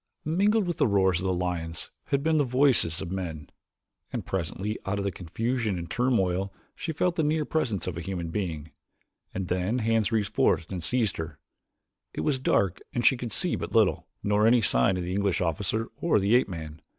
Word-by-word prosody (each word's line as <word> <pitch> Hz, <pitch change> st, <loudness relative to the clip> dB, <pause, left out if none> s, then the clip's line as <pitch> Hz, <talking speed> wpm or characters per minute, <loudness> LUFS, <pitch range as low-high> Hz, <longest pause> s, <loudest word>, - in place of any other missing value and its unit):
Mingled 200 Hz, +7 st, +2 dB
with 175 Hz, -1 st, -2 dB
the -, -, +3 dB
roars 95 Hz, -4 st, +3 dB
of 90 Hz, -, -4 dB
the -, -, +2 dB
lions 85 Hz, -2 st, -3 dB
had 140 Hz, 0 st, 0 dB
been 160 Hz, 0 st, +3 dB
the -, -, +4 dB
voices 125 Hz, -, +3 dB
of 95 Hz, -2 st, -5 dB
men, 80 Hz, -6 st, -5 dB, 0.6 s
and -, -, -4 dB
presently 95 Hz, +4 st, -3 dB
out 95 Hz, +1 st, -2 dB
of 100 Hz, -, -2 dB
the 100 Hz, -, 0 dB
confusion 110 Hz, +5 st, -2 dB
and 85 Hz, -1 st, -6 dB
turmoil 95 Hz, -6 st, +1 dB, 0.2 s
she 165 Hz, -, -3 dB
felt 175 Hz, +3 st, 0 dB
the -, -, +3 dB
near 155 Hz, 0 st, +1 dB
presence 120 Hz, -, -1 dB
of 90 Hz, -3 st, -4 dB
a -, -, -3 dB
human 85 Hz, -2 st, -4 dB
being, 80 Hz, -6 st, -3 dB, 0.6 s
and 95 Hz, -1 st, -4 dB
then 90 Hz, +7 st, 0 dB
hands 115 Hz, -2 st, +1 dB
reached 110 Hz, -3 st, 0 dB
forth 80 Hz, -, +2 dB
and 90 Hz, -3 st, -4 dB
seized 115 Hz, +1 st, +1 dB
her. 80 Hz, -3 st, -5 dB, 0.8 s
It -, -, -2 dB
was 140 Hz, -3 st, +1 dB
dark 95 Hz, -7 st, +1 dB, 0.2 s
and 120 Hz, -1 st, 0 dB
she 130 Hz, -, +6 dB
could 120 Hz, -2 st, -5 dB
see -, -, +1 dB
but -, -, -5 dB
little, -, -, +3 dB, 0.2 s
nor 105 Hz, +1 st, +3 dB
any 120 Hz, +1 st, +6 dB
sign 65 Hz, +4 st, +3 dB
of 90 Hz, -, -2 dB
the 90 Hz, +1 st, -3 dB
English 100 Hz, -2 st, +1 dB
officer 95 Hz, +6 st, -1 dB
or 170 Hz, -, +2 dB
the 100 Hz, +2 st, +2 dB
ape 125 Hz, -3 st, +4 dB
man. 80 Hz, -3 st, -7 dB
100 Hz, 205 wpm, -27 LUFS, 90-125 Hz, 0.8 s, she